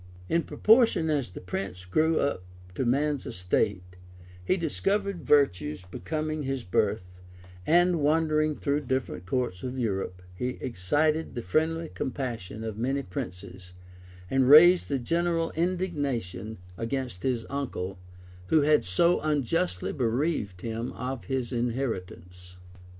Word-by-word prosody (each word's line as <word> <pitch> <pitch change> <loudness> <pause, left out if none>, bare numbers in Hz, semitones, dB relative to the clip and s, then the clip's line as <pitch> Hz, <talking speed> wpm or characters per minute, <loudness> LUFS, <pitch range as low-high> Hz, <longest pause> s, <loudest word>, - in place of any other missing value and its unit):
] 90 +1 -19
In 170 - +4
proportion 220 -6 +4
as 140 -7 0
the 90 - -9
prince 90 0 -5
grew 155 - +2
up 140 -10 0 0.3
to 125 +7 -1
man's 145 +2 +1
estate, 90 0 -1 0.5
he 185 - +1
discovered 195 +3 -1
virtues 90 - +2
becoming 155 - -3
his 135 -2 -3
birth; 90 -2 -1 0.5
and 175 +1 +4
wandering 155 0 +2
through 145 -1 -1
different 125 -9 -2
courts 120 -5 -1
of 130 0 -4
Europe, 95 -6 -2
he 125 +7 -3
excited 145 - 0
the 120 - -4
friendly 160 - 0
compassion 120 - -4
of 110 -1 -5
many 135 +4 0
princes, 90 -1 -7 0.5
and 130 +4 +2
raised 175 +5 +8
a 140 - +2
general 165 +5 0
indignation 145 - -2 0.2
against 120 -4 -3
his 120 -2 -1
uncle, 100 -9 -4 0.5
who 155 - +4
had 150 0 +4
so 170 - +3
unjustly 125 - 0
bereaved 120 - -1
him 115 +1 -3
of 130 -1 -5
his 130 -2 -2
inheritance. 95 -8 -4
130 Hz, 130 wpm, -28 LUFS, 95-155 Hz, 0.5 s, raised